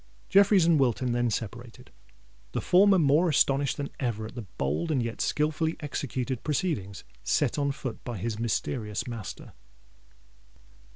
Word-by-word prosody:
Jeffreys 200 -2 +5
and 165 -3 +4
Wilton 125 -1 +1
then 120 0 +1
separated, 115 +2 -6 0.6
the - - 0
former 195 +2 +5
more 160 +2 +4
astonished 140 -2 +2
than 140 -1 -4
ever 115 -5 -2
at 110 - -9
the 120 -5 -7
bold 75 - -1
and 135 -6 +1
yet 115 -1 -4
skilfully 155 +2 0
executed 130 -4 -3
proceedings 140 - -2 0.2
set - - +1
on 140 -1 +1
foot 130 -4 -6
by 120 -3 -5
his 110 +3 -3
mysterious 110 -2 -2
master. 115 -5 -7
130 Hz, 140 wpm, -28 LUFS, 115-155 Hz, 0.6 s, Jeffreys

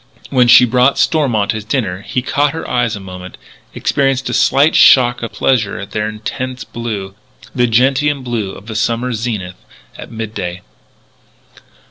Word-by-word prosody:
When 125 -3 +4
she 125 +1 +8
brought 125 +3 +2
Stormont 125 - +1
his 110 -1 -5
dinner 105 -5 -2
he 125 +4 -3
caught 145 +2 0
her 160 - -6
eyes 120 -3 0
a - - -7
moment 90 -1 -10 0.4
experienced 135 -1 0
a - - -4
slight 145 +4 +3
shock 120 -2 +5
of 115 - -5
pleasure 115 -6 0
at 100 - -8
their 105 0 -2
intense 125 +4 -5
blue 105 -5 -6 0.4
the 125 -1 +2
gentian 135 +4 +1
blue 115 -6 -3
of 100 - -12
the 110 0 -7
summer 120 +3 -1
zenith 105 -6 -5 0.3
at - - -10
midday. 100 -5 -5
120 Hz, 155 wpm, -15 LUFS, 105-130 Hz, 0.4 s, she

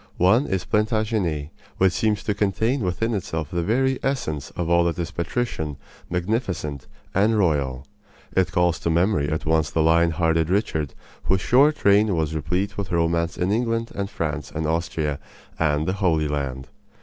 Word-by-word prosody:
One 110 +10 +4
is 95 -2 -1
Plantagenet, 105 -8 0 0.3
which 95 -1 +3
seems 105 -3 0
to 105 - 0
contain 110 +6 0
within 110 +5 -1
itself 80 -6 -3
the 85 - 0
very 130 +8 +1
essence 80 - -2
of 85 - -2
all 85 0 +4
that 85 -2 0
is 85 -2 -3
patrician, 85 - -3 0.3
magnificent, 90 - -2 0.3
and 105 +3 +3
royal. 70 -8 0 0.5
It 95 -1 +2
calls 85 -1 +2
to - - -1
memory 85 -3 +2
at 80 0 -2
once 80 -1 +2
the 80 - +1
lion 85 +1 +4
hearted 80 0 +1
Richard, 90 - -1 0.3
whose 95 0 +2
short 140 +8 +3
reign 100 -1 +5
was 80 -1 -1
replete 90 +7 -2
with 100 - -4
romance 85 0 +1
in 90 +2 0
England 115 +1 0
and 100 -1 -3
France 75 -6 -3
and 80 +1 -3
Austria 80 -3 -1 0.4
and 75 -1 +1
the 95 - +1
Holy 85 -6 +1
Land. 65 -3 -3
85 Hz, 165 wpm, -23 LUFS, 80-105 Hz, 0.5 s, reign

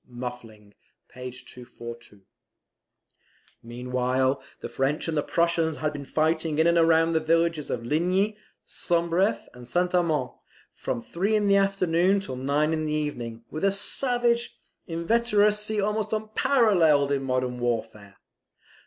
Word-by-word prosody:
[Muffling, 120 -4 -9 0.4
p. 125 0 -7
242.] 120 -4 -11 1.4
Meanwhile 125 +3 -1 0.2
the - - -6
French 140 +5 -1
and 165 - -2
the 150 - +2
Prussians 165 -1 0
had 150 -1 -2
been 145 -1 -7
fighting 160 +1 0
in 160 - +3
and 170 -1 +4
round 165 0 +3
the 160 - +3
villages 165 -1 +1
of 115 -1 -3
Ligny, 185 - +1 0.3
Sombref, 170 +3 0
and 125 -1 -12
St. 180 +6 0
Armand, 160 -7 +1 0.4
from - - -4
three 195 - -1
in 210 -1 +2
the 200 0 +4
afternoon 195 -1 +2
to 160 -10 -6
nine 145 +4 0
in 155 -1 -1
the 150 - -2
evening, 120 -7 -4
with 155 - -5
a 195 - +5
savage 240 +3 0 0.3
inveteracy 210 +3 +1
almost 210 +2 -1
unparalleled 210 - +3
in 140 -1 +1
modern 130 -1 -2
warfare. 110 -4 -3
160 Hz, 135 wpm, -26 LUFS, 125-190 Hz, 1.4 s, a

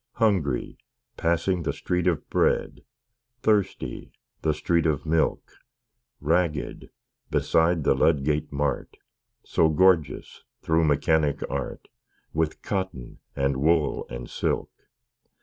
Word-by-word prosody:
Hungry 95 - 0 0.4
passing 85 +2 0
the 75 -3 -1
Street 90 +4 -1
of 85 -5 0
Bread; - - +1 0.6
Thirsty 105 - 0 0.3
the 80 - +2
street 80 +2 +1
of 75 -1 -1
Milk; 80 0 0 0.7
Ragged 80 -1 -1 0.4
beside 80 -1 +2
the - - +4
Ludgate 75 -1 +1
Mart, 70 0 -2 0.5
So 80 - +2
gorgeous, 80 -4 +2 0.2
through 80 0 +2
Mechanic 75 0 +2
Art, - - -4 0.5
With 80 0 -1
cotton, 95 -11 -4 0.2
and 70 -1 0
wool, 75 +1 +1
and - - -6
silk! - - -2
80 Hz, 105 wpm, -26 LUFS, 70-85 Hz, 0.7 s, the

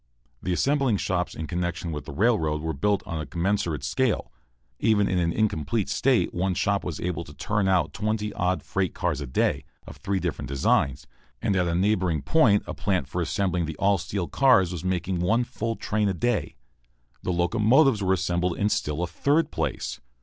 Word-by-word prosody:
The 90 - -2
assembling 135 +3 +2
shops 90 -2 -1
in 80 - -4
connection 85 -1 -3
with 75 -2 -5
the - - -7
railroad 80 - +1
were 80 +1 -3
built 100 +8 0
on 80 -2 -4
a - - -5
commensurate 85 -2 -1
scale. 120 - 0 0.5
Even 105 -3 +3
in 90 - +1
an 85 -1 +1
incomplete 100 0 0
state 130 -2 +2
one 90 +1 0
shop 100 +2 +1
was 85 -5 -4
able 85 -1 -2
to 75 -2 -13
turn 100 +7 0
out 95 -2 +2
twenty 105 0 -2
odd 90 +1 0
freight 95 -2 -2
cars 80 -6 -1
a 70 - -5
day, 60 - 0 0.2
of - - -11
three 100 -1 -1
different 80 - -3
designs, 65 -1 +1 0.3
and 100 - 0
at 90 -2 +2
a 85 - 0
neighboring 90 -5 +1
point 115 -11 +4
a - - -5
plant 95 -3 -1
for 90 - -3
assembling 90 -1 0
the 80 - -5
all 100 -1 +2
steel 90 +1 -3
cars 110 -10 +4
was 90 -1 -5
making 95 0 -1
one 110 +8 +2
full 115 -2 -3
train 105 -2 0
a 95 - -1
day. 120 +4 -1 0.7
The - - -2
locomotives 110 - +3
were 95 -1 +2
assembled 90 -1 0
in 105 - +1
still 75 -3 -1
a - - -1
third 145 - +1
place. - - -3
95 Hz, 195 wpm, -26 LUFS, 85-105 Hz, 0.7 s, point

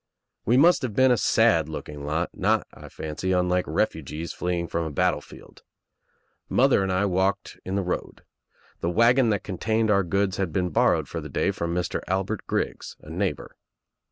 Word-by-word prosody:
We 120 +3 +3
must 170 +5 +5
have 120 -6 -4
been 130 0 +5
a - - +5
sad 110 -10 +3
looking 75 -2 -7
lot, 80 +3 -1
not, - - +1
I - - -12
fancy, 80 +4 -3
unlike 90 0 +1
refugees 80 +2 -2
fleeing 90 -1 -2
from 85 0 -2
a 80 - -3
battlefield. 75 - -3 0.9
Mother 130 -4 +4
and 95 -1 -1
I 95 +2 +1
walked 95 +1 -1
in 95 - -3
the 100 - 0
road. 90 - -4 0.6
The 85 - -1
wagon 115 +6 +4
that 100 -3 0
contained 110 +3 0
our 100 -1 +4
goods 100 +2 0
had 95 -4 -1
been 90 +2 0
borrowed - - +2
for - - -5
the - - -8
day - - 0
from 85 0 -3
Mr. 90 -1 -2
Albert 95 +3 -2
Griggs, - - -3
a - - -11
neighbor. - - -3
95 Hz, 180 wpm, -25 LUFS, 85-110 Hz, 0.9 s, must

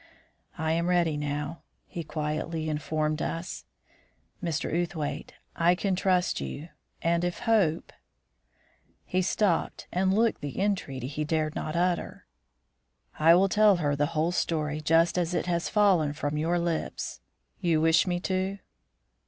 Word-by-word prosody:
"I 160 0 0
am 170 +1 +1
ready 175 -3 +2
now," 150 +2 -3 0.2
he 170 - -6
quietly 155 +1 -3
informed 155 0 -1
us. 165 +2 -4 0.8
"Mr. 165 -2 -2
Outhwaite, 165 -3 -3 0.2
I 170 +1 +4
can 195 0 0
trust 180 -1 +1
you; 155 +4 -6 0.3
and 170 +1 +2
if 175 0 -2
Hope 200 -9 +1 0.6
" - - -38
He 185 - +3
stopped 185 -1 0
and 190 +1 +1
looked 225 +3 +2
the 145 +2 -5
entreaty 180 -11 -1
he 150 +3 -3
dared 155 0 0
not 155 +1 -4
utter. 175 0 -1 0.9
"I 165 +2 +7
will 190 +2 +4
tell 210 +1 +5
her 145 -5 0
the 145 +1 +1
whole 160 +3 +2
story 155 -4 -1
just 165 +3 +3
as 175 0 -1
it - - 0
has 170 -1 -1
fallen 185 -8 +3
from 150 0 -3
your 165 +3 +1
lips. 165 - -3 0.4
You 165 -3 +2
wish 160 +2 +4
me 175 -1 0
to?" 190 +1 -1
165 Hz, 145 wpm, -28 LUFS, 155-180 Hz, 0.9 s, I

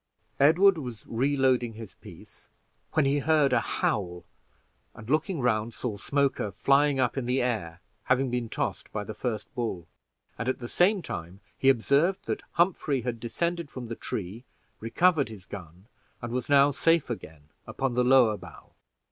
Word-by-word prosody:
Edward 170 +5 +5
was 125 -6 -8
reloading 130 -1 +1
his 110 -2 -10
piece - - -14 0.4
when 155 -3 +3
he 140 +1 +2
heard 150 -2 +3
a - - +4
howl, 90 -3 -2 0.7
and 110 - -11
looking 155 +5 0
round, 115 -1 0
saw 120 -5 -3
Smoker 140 0 0
flying 140 +7 +2
up 125 +1 +1
in 125 -3 -2
the 125 +2 +1
air, 100 -9 -2 0.2
having 130 0 +1
been 120 -2 -2
tossed - - -3
by 105 - -3
the 110 - -7
first 110 -2 -4
bull; 110 -9 -4 0.5
and 115 +3 -1
at 130 - -1
the 120 - -7
same 185 - +2
time 85 +3 -6 0.2
he 135 - +3
observed 140 +9 +2
that - - -3
Humphrey 165 -6 +1
had 120 -1 -4
descended 170 +7 -2
from 125 -4 -8
the 115 - -4
tree, 105 +4 -5 0.4
recovered 145 +4 +2
his 100 -4 -11
gun, 90 -1 -10 0.3
and 120 -1 -6
was 125 +2 -3
now 140 0 +6
safe 165 -1 +2
again 80 -9 -8 0.2
upon 135 -2 -2
the 125 +1 +2
lower 125 -4 +5
bough. - - -14
125 Hz, 165 wpm, -27 LUFS, 110-140 Hz, 0.7 s, now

